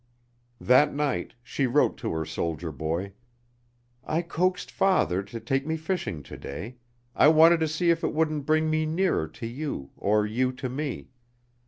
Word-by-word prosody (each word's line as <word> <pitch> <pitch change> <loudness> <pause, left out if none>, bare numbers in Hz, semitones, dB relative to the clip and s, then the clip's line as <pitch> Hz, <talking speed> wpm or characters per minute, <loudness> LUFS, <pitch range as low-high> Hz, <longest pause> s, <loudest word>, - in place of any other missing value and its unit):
That 140 +4 +4
night 145 -2 -2
she 135 +2 -1
wrote 140 +4 +2
to - - -3
her 80 0 -2
soldier 85 +1 -3
boy: 80 +7 -3 0.9
"I 160 +5 -1
coaxed 180 +2 -1
father 185 - +2
to 100 +4 -8
take 135 +5 -1
me 160 0 -1
fishing 160 - -3
to - - -10
day. 105 - -7 0.4
I - - +6
wanted 160 +2 +7
to 160 - +1
see 170 +3 +2
if 165 0 0
it - - +1
wouldn't 155 -2 -1
bring 155 0 +3
me 155 0 +1
nearer 165 - +1
to 80 +8 -9
you 120 - -5
or 105 +1 +1
you 125 +4 0
to 130 0 -5
me. 140 0 -5
140 Hz, 170 wpm, -26 LUFS, 105-160 Hz, 0.9 s, wanted